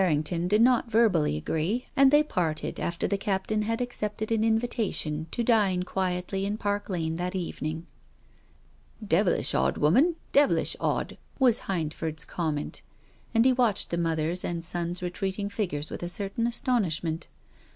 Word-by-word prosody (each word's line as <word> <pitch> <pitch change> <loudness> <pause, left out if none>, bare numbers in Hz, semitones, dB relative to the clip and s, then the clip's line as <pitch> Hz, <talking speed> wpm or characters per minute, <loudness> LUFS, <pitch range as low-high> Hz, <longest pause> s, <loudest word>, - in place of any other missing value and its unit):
Mrs. - - +4
Errington 165 +2 0
did 210 +4 +3
not 245 -1 +3
verbally 200 - +3
agree, 165 - -1
and 275 0 +6
they 295 +2 +5
parted 160 - -2
after 170 0 -2
the 200 - -1
Captain 205 +2 -1
had 225 +3 -1
accepted 215 -3 -3
an 220 -1 +2
invita 225 -1 +1
tion 155 +1 -2
to 235 - -2
dine 205 -6 +3
quietly 185 +1 -2
in 205 +2 -2
Park 205 -1 -2
Lane 165 -3 -2
that 180 +2 -3
evening. 165 -2 -4 0.6
" - - -18
Devilish - - +2
odd 65 +1 +1
woman, 260 - +4 0.2
devilish 285 0 +3
odd! - - -2
" - - -30
was 250 -4 +2
Hindford's 160 -3 -2
comment. 155 -4 -3 0.5
And 225 +1 +5
he 260 - +5
watched 240 -5 +1
the 170 - 0
mother's 165 +1 0
and 170 -1 -3
son's 175 +1 -2
retreating 190 +3 -3
figures 175 -8 -3
with - - -6
a 175 - -3
certain 200 +5 -1
astonishment. 180 - -1
190 Hz, 160 wpm, -27 LUFS, 165-225 Hz, 0.6 s, and